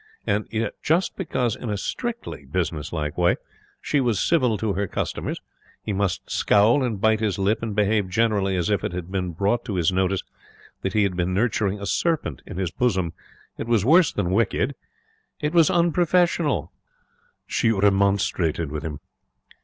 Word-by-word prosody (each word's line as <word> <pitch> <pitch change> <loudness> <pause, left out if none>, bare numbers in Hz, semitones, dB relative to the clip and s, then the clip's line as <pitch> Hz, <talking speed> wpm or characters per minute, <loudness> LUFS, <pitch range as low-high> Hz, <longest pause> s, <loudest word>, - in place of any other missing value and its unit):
And 105 +1 0
yet 110 -1 -2
just 170 +5 +1
because, 130 - -1
in 120 - -6
a 105 - -1
strictly 235 - -4
business 80 -1 -2
like 75 -1 -3
way, 90 0 +4 0.4
she 145 - 0
was 120 -6 +1
civil 125 -10 +2
to 105 -1 -1
her 100 +2 -1
customers, - - -3 0.4
he 105 - -2
must 100 -2 -1
scowl 115 +7 +3
and 115 -5 -2
bite 110 +1 +3
his 105 -5 0
lip 100 +3 +1
and 110 -3 -3
behave 105 -2 +2
generally 100 -2 +1
as 90 +2 0
if 100 - +1
it - - -2
had 90 0 -5
been 90 -3 -2
brought 100 +8 0
to 105 -6 -3
his 85 -1 +2
notice 95 +1 0 0.6
that 95 - -2
he 105 - +3
had 95 -2 0
been 90 +1 -1
nurturing 105 -2 0
a 100 - -5
serpent 145 - -1
in - - -7
his 95 -3 -1
bosom. 95 -9 0 0.5
It - - -4
was 115 -4 +2
worse 165 +4 +5
than 90 -3 -1
wicked 115 +6 +1 0.7
it 150 +1 -1
was 165 -3 +5
unprofessional. 175 +1 +2 0.7
She 115 - +1
remonstrated 95 -6 +1
with 75 0 -3
him. 80 -3 -6
100 Hz, 175 wpm, -24 LUFS, 90-120 Hz, 0.7 s, worse